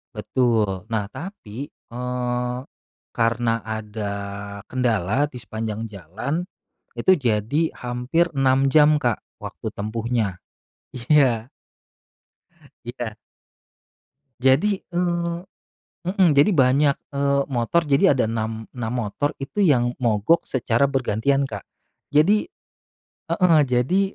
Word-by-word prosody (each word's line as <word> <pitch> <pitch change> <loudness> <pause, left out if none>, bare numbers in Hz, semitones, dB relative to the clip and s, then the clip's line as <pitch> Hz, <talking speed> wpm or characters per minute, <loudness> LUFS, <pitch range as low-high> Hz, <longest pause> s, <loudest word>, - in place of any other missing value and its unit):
Betul. 115 -4 +1 0.2
Nah 105 -3 0
tapi, 140 - -8
eee, 125 0 -3 0.6
karena 115 0 +1
ada 105 -1 -4 0.5
kendala 120 -1 +1
di 125 - -8
sepanjang 110 -1 -4
jalan, 105 - -4 0.6
itu - - +4
jadi 120 - 0 0.2
hampir 125 +8 0
6 135 0 +3
jam 150 +1 +5
Kak, 120 -6 0 0.2
waktu - - -7
tempuhnya. 110 -2 -2 0.6
Iya. 125 -3 +3 1.4
Iya. 120 -2 -5 1.2
Jadi, 145 +11 +3
eee 175 -1 -1 0.7
heeh, 185 0 +3
jadi, 145 +9 +5
banyak, 140 -2 +4 0.2
eee, 140 0 +2
motor. 135 +6 +1
Jadi 140 -1 +4
ada 135 -3 +2
6, 110 0 -3
6 115 -2 -3
motor 125 +4 -1
itu 135 +9 -3
yang 120 -8 +3
mogok 115 +7 +3
secara 130 +1 +1
bergantian 135 +1 +1
Kak. 105 -5 -7 0.5
Jadi 200 - +3 0.8
heeh, 175 -5 +4
jadi 130 +8 +2
125 Hz, 100 wpm, -23 LUFS, 115-145 Hz, 1.4 s, jam